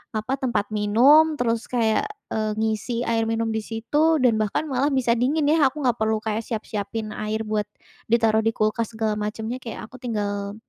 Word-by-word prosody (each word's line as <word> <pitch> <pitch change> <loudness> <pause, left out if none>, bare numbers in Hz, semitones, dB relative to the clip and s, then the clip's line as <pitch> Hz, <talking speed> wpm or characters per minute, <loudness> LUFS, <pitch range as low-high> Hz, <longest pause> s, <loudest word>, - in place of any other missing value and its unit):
apa, 255 +6 -2
tempat 230 -5 -1
minum, 260 +10 +5
terus 230 -2 0
kayak, 235 - +1 0.2
eee, 215 -1 -1
ngisi 220 +2 -1
air 225 -1 0
minum 225 0 -1
di 220 - -1
situ 290 +9 +1
dan 225 -3 +4
bahkan 215 +7 0
malah 270 +1 +1
bisa 255 -3 +2
dingin 280 +6 +1
ya. 300 -2 +4
Aku 300 +1 -6
nggak 245 -2 +2
perlu 220 0 +1
kayak 220 +1 -2
siap-siapin 215 0 -4
air 215 +1 -2
buat 210 -1 -2 0.4
ditaruh 225 -2 +4
di 225 - +2
kulkas 215 +1 0
segala 215 -1 -1
macemnya, 220 +4 -4
kayak 230 -3 -7
aku 255 +1 -13
tinggal, 205 -4 -3
225 Hz, 180 wpm, -23 LUFS, 215-250 Hz, 0.4 s, minum